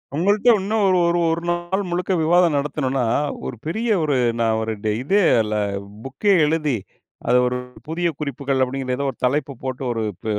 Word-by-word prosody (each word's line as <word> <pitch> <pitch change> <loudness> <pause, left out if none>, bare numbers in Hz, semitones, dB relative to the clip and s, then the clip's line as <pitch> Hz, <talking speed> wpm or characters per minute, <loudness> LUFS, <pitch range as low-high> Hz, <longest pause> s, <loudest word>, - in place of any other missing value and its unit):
உங்கள்ட்ட 200 +8 +3
இன்னும் 210 +3 0
ஒரு 185 - +3
ஒரு 170 0 +2
ஒரு 165 +1 -1
நாள் 175 +3 -1
முழுக்க 180 +2 -1
விவாதம் 170 -1 +4
நடத்துணோம்னா, 135 -3 -1 0.4
ஒரு - - -4
பெரிய 220 +9 -2 0.2
ஒரு 150 -3 +1 0.3
நான் 110 -1 +2
ஒரு 110 0 -2
ட 110 - 0
இதே, 200 +9 +3 0.2
இல்ல 105 0 -3 0.5
புக்கே 140 +10 +1
எழுதி, 150 -3 0 0.5
அத - - +4
ஒரு 125 0 -1 0.3
புதிய 170 +2 -1
குறிப்புகள் 140 -2 -2
அப்பிடீங்கிற 130 0 -2
ஏதோ 140 +1 -1
ஒரு - - -21
தலைப்பு 140 +2 0
போட்டு 130 0 -4
ஒரு 115 -2 -2 0.2
ப - - -16
150 Hz, 175 wpm, -21 LUFS, 130-175 Hz, 0.5 s, விவாதம்